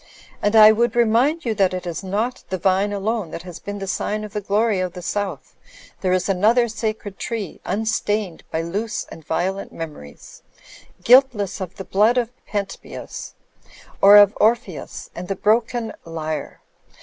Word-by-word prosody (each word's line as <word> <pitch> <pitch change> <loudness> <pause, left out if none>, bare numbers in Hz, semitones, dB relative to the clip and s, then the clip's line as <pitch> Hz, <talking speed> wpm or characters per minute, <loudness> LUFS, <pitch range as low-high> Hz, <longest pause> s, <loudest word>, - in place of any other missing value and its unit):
And 205 +2 +1
I 215 -1 +9
would 235 +3 +1
remind 240 +8 +2
you 230 - +1
that 195 -3 +2
it 180 - -5
is 175 +1 -4
not 215 +7 -2
the 185 - -1
vine 190 +3 +1
alone 205 -1 -2
that 165 - -7
has 180 -2 -9
been 205 0 -6
the 195 - -5
sign 210 +2 -2
of 210 -1 -8
the 210 - -2
glory 205 +1 +1
of 185 -1 -2
the 180 - -8
South. 195 -6 -3 0.5
There 185 - +1
is 185 0 +1
another 215 +6 +3
sacred 215 -3 -4
tree 225 -4 -5
unstained 210 -4 -1
by 160 +1 -2
loose 205 +7 -3
and 160 - -10
violent 185 +6 -2
memories, 150 - -10 0.6
guiltless 245 -7 +4
of 185 0 -6
the 190 - -8
blood 215 +5 +3
of 240 -1 0 0.2
Pen 205 -1 -1
tbeus 195 - -9 0.7
or 200 +1 +9
of 205 0 +7
Orpheus 210 -8 -1
and 180 +1 -7
the 195 - -2
broken 225 +2 +1
l)rre. 160 -2 -5
205 Hz, 170 wpm, -21 LUFS, 185-220 Hz, 0.7 s, I